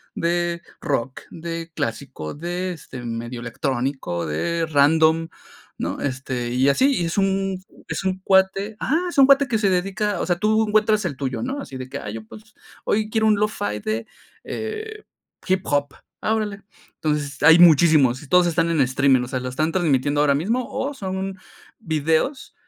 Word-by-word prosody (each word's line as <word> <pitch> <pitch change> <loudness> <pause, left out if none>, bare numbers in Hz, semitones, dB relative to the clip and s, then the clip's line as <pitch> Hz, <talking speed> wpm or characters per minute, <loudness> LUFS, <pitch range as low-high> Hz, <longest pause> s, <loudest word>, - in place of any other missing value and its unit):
de 170 0 -1 0.2
rock, 135 -2 -2
de 165 0 -6
clásico, 75 - -4
de, 175 +4 -3
este, 130 -5 -10
medio 120 +1 -5
electrónico, 120 - -2
de 165 - -1
random, 160 +2 +3 0.5
¿no?, - - -3
este, 130 -3 -3
y 125 +2 +2
así. 260 - +4
Y - - 0
es 165 - -3
un 195 -1 0 0.2
es - - -3
un 190 -1 -1
cuate 195 +2 +2
ajá, 305 +8 +1
es - - -8
un 275 - +8
cuate 275 0 +5
que 225 -2 +1
se 205 -2 +2
dedica, 195 +3 0
o - - -1
sea, 175 -1 0
tú 215 +3 +2
encuentras 215 -1 +2
el 160 -6 -2
tuyo, 130 -1 -3
¿no?, 270 +3 -3
así 135 - -8
de 130 0 -6
que: - - -6
"Ay, 105 +1 -6
yo, 110 -1 -8
pues, 215 - -14 0.3
hoy 215 +1 0
quiero 220 0 +1
un 215 - +5
lo-fi 105 - -1
de, 110 +2 -3 0.4
eh, 435 -1 -6 0.4
hip 185 0 +2
hop". 145 -1 0 0.3
Ah, 220 - +1
órale. 205 -2 -3 0.3
Entonces, 150 -2 -2
hay 160 +3 +8
muchísimos 155 -6 +6
y 150 - -12
todos 180 +3 +5
están 165 0 +1
en 165 -3 +2
streaming, 130 0 +3
o 125 - -4
sea, 130 - -2
lo 125 - -5
están 155 +6 -1
transmitiendo 145 -5 +1
ahora 145 -1 +4
mismo 230 - -1
o 285 +2 -3
son 190 -4 -4 0.4
videos, 160 - -1
165 Hz, 180 wpm, -22 LUFS, 135-200 Hz, 0.5 s, un